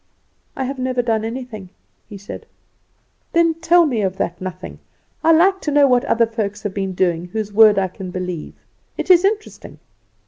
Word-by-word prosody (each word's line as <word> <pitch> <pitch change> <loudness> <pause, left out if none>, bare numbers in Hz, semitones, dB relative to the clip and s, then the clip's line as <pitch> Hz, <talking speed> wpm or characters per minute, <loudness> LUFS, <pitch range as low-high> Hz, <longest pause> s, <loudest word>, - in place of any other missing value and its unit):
"I 265 - -3
have 265 +1 -4
never 255 -1 -1
done 225 -2 0
anything," 225 -4 -6 0.4
he 205 - -9
said. 200 +1 -10 0.9
"Then 335 -1 +3
tell 335 +1 +3
me 245 -8 -1
of 190 -1 -2
that 170 +2 -3
nothing. 185 0 -7 0.4
I 325 - +5
like 380 +4 +4
to 300 - -2
know 290 0 +5
what 250 -2 +2
other 230 0 +2
folks 215 -2 -4
have 205 -3 -3
been 195 -1 -3
doing 175 -2 0
whose 210 +2 -5
word 215 -1 +6
I 190 -1 +1
can 185 0 -9
believe. 180 -3 -5 0.4
It - - +1
is 355 0 +6
interesting. 425 +2 -3
225 Hz, 180 wpm, -19 LUFS, 190-285 Hz, 0.9 s, word